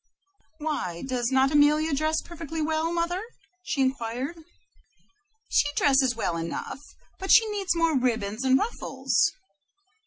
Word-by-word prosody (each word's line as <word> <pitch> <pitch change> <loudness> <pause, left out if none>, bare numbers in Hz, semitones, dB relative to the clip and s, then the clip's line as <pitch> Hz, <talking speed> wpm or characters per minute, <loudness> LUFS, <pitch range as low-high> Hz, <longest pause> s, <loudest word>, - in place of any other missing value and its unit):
"Why, 295 - -3
does 250 -2 -1
not 265 +1 +3
Amelia 300 +1 +3
dress 310 +2 0
perfectly 325 -2 -7
well, 315 +1 0
mother?" 345 +2 -1 0.4
she 305 -6 -2
inquired. 260 +3 -2 1.1
"She - - +2
dresses 265 -3 +3
well 180 -7 -2
enough, 165 +9 -5 0.4
but 385 - -1
she 450 - +7
needs 395 -4 -1
more 330 -2 +2
ribbons 230 -3 -1
and 260 0 +4
ruffles." 265 - 0
285 Hz, 125 wpm, -26 LUFS, 255-320 Hz, 1.1 s, she